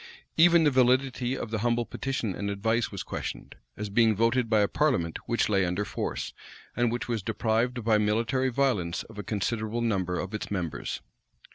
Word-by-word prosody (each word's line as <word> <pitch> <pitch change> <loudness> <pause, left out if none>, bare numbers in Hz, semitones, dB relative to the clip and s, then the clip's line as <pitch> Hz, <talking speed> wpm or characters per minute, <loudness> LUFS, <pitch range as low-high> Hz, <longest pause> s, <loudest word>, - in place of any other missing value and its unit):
Even 170 0 +6
the 150 - +4
validity 130 0 +2
of 110 - -5
the 110 - -1
humble 120 +1 +1
petition 130 -7 -3
and 100 +2 -3
advice 110 +3 0
was - - -5
questioned, - - -6 0.2
as 105 -1 -4
being 110 0 +4
voted 115 +2 +2
by 110 -2 +4
a 100 - +3
parliament 120 - 0
which 115 - +1
lay 100 -2 +2
under 90 +3 -1
force, - - -4 0.4
and 120 -1 +2
which 120 +1 -3
was 115 -3 -1
deprived 115 +4 0
by 110 -1 +3
military 115 +5 +1
violence 115 -10 0
of 110 -2 -12
a - - -4
considerable 110 +3 -2
number 95 -6 0
of 95 +3 -5
its 110 - -4
members. 90 -6 -3
115 Hz, 180 wpm, -28 LUFS, 105-125 Hz, 0.4 s, Even